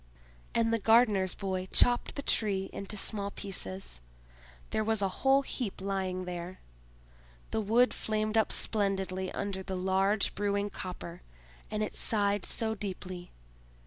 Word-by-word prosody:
And 230 Hz, 0 st, +3 dB
the 230 Hz, -, +2 dB
gardener's 215 Hz, -4 st, +4 dB
boy 190 Hz, -2 st, -2 dB
chopped 245 Hz, 0 st, +3 dB
the 280 Hz, -, -4 dB
Tree 195 Hz, -6 st, +1 dB
into 200 Hz, +2 st, -6 dB
small 200 Hz, 0 st, 0 dB
pieces; 95 Hz, -, -4 dB, 0.7 s
there 220 Hz, -, +1 dB
was 220 Hz, 0 st, +1 dB
a 200 Hz, -, +2 dB
whole 270 Hz, +1 st, +5 dB
heap 240 Hz, -7 st, -3 dB
lying 190 Hz, -1 st, -2 dB
there. 180 Hz, +1 st, -6 dB, 0.9 s
The 220 Hz, -, +1 dB
wood 230 Hz, +4 st, +4 dB
flamed 215 Hz, 0 st, -1 dB
up 220 Hz, -1 st, +3 dB
splendidly 190 Hz, -3 st, 0 dB
under 195 Hz, -1 st, -3 dB
the 190 Hz, 0 st, -4 dB
large 190 Hz, +2 st, +2 dB
brewing 200 Hz, 0 st, 0 dB
copper, 180 Hz, -1 st, -7 dB, 0.5 s
and 215 Hz, 0 st, -1 dB
it 215 Hz, -, -3 dB
sighed 205 Hz, -2 st, +2 dB
so 220 Hz, -1 st, 0 dB
deeply! 185 Hz, -3 st, -6 dB
200 Hz, 140 wpm, -31 LUFS, 190-215 Hz, 0.9 s, whole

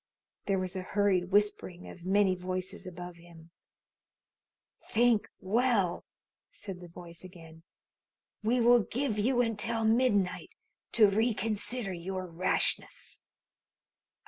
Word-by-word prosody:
There 195 Hz, -1 st, +2 dB
was 185 Hz, 0 st, -3 dB
a 185 Hz, -, -2 dB
hurried 190 Hz, -1 st, +1 dB
whispering 200 Hz, -3 st, 0 dB
of 175 Hz, 0 st, -10 dB
many 195 Hz, 0 st, +4 dB
voices 185 Hz, +2 st, -4 dB
above 175 Hz, -1 st, -8 dB
him. 170 Hz, -1 st, -16 dB, 1.4 s
"Think 235 Hz, -2 st, +3 dB
well," 215 Hz, -2 st, +1 dB, 0.4 s
said 195 Hz, -3 st, -6 dB
the 175 Hz, -, -9 dB
voice 170 Hz, 0 st, -11 dB
again. 165 Hz, -3 st, -13 dB, 0.8 s
"We 240 Hz, +3 st, +2 dB
will 240 Hz, +1 st, +6 dB
give 230 Hz, +1 st, -2 dB
you 245 Hz, +3 st, +3 dB
until 230 Hz, 0 st, 0 dB
midnight 220 Hz, -5 st, +1 dB, 0.4 s
to 220 Hz, -3 st, +7 dB
reconsider 220 Hz, 0 st, 0 dB
your 185 Hz, +2 st, -4 dB
rashness. 175 Hz, +1 st, -1 dB
195 Hz, 110 wpm, -30 LUFS, 180-225 Hz, 1.4 s, to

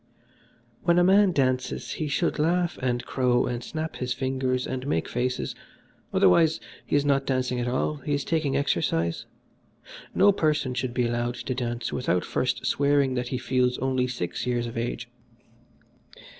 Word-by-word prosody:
"When 170 Hz, 0 st, +3 dB
a 175 Hz, -, +5 dB
man 195 Hz, +1 st, +5 dB
dances 130 Hz, -4 st, 0 dB
he 155 Hz, -, -3 dB
should 155 Hz, +2 st, 0 dB
laugh 175 Hz, +2 st, +1 dB
and 125 Hz, -1 st, -1 dB
crow 125 Hz, -2 st, +2 dB
and 120 Hz, 0 st, -3 dB
snap 160 Hz, +3 st, -4 dB
his 125 Hz, -1 st, -2 dB
fingers 130 Hz, 0 st, -1 dB
and 130 Hz, +1 st, -4 dB
make 80 Hz, -, 0 dB
faces; 125 Hz, +1 st, -2 dB, 0.6 s
otherwise, 160 Hz, -, +4 dB, 0.3 s
he -, -, 0 dB
is 145 Hz, 0 st, +2 dB
not 140 Hz, -1 st, +2 dB
dancing 130 Hz, -1 st, 0 dB
at 120 Hz, -, -1 dB
all, 130 Hz, +4 st, 0 dB
he 145 Hz, 0 st, -2 dB
is 140 Hz, -, -2 dB
taking 155 Hz, -4 st, 0 dB
exercise. 85 Hz, -, 0 dB, 0.9 s
No 200 Hz, +2 st, +6 dB
person 150 Hz, -8 st, 0 dB
should 125 Hz, 0 st, -3 dB
be 125 Hz, -, +2 dB
allowed 120 Hz, +1 st, -1 dB
to 130 Hz, -, -4 dB
dance 120 Hz, -1 st, -3 dB
without 90 Hz, -8 st, 0 dB
first 125 Hz, -1 st, -1 dB
swearing 140 Hz, -2 st, +2 dB
that 125 Hz, -1 st, -2 dB
he 130 Hz, -, -2 dB
feels 125 Hz, 0 st, +1 dB
only 130 Hz, -1 st, 0 dB
six 120 Hz, -3 st, -4 dB
years 120 Hz, -1 st, 0 dB
of 115 Hz, -, -7 dB
age. 115 Hz, 0 st, -3 dB
130 Hz, 165 wpm, -26 LUFS, 120-145 Hz, 0.9 s, No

